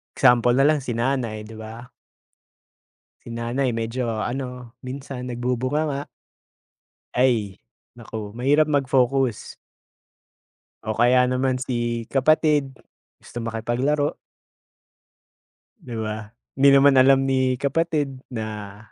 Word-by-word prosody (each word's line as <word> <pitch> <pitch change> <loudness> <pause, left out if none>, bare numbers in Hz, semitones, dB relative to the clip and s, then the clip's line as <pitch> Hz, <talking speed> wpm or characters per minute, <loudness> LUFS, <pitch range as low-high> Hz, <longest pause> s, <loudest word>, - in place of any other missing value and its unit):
Example 120 0 +4
na 135 +2 +4
lang, 155 - +3
si 120 - -2
nanay 115 -2 -1
'di 110 +1 -11
ba? 110 +3 -9 1.3
Si - - -12
nanay 120 +3 -1
medyo 115 +2 -2
ano, 125 -2 -5
minsan 130 -1 -6
nagbubunganga. 130 +4 -2 1.1
Ay, 115 - +1 0.3
naku. 110 -3 -8
Mahirap 140 +6 +3
mag-focus. 135 -4 +1 1.3
O 110 - -2
kaya 125 +1 +5
naman 130 0 +1
si 120 -2 -2
kapatid, 145 0 +2 0.4
gusto 120 - -9
makipaglaro. 120 +6 -1 1.7
'Di 120 - -8
ba? 110 0 -5 0.2
Hindi 140 +1 +5
naman 140 0 +6
alam 135 +1 +5
ni 130 -1 +1
kapatid, 145 -1 -1
na 105 -4 -6
125 Hz, 100 wpm, -23 LUFS, 115-135 Hz, 1.7 s, naman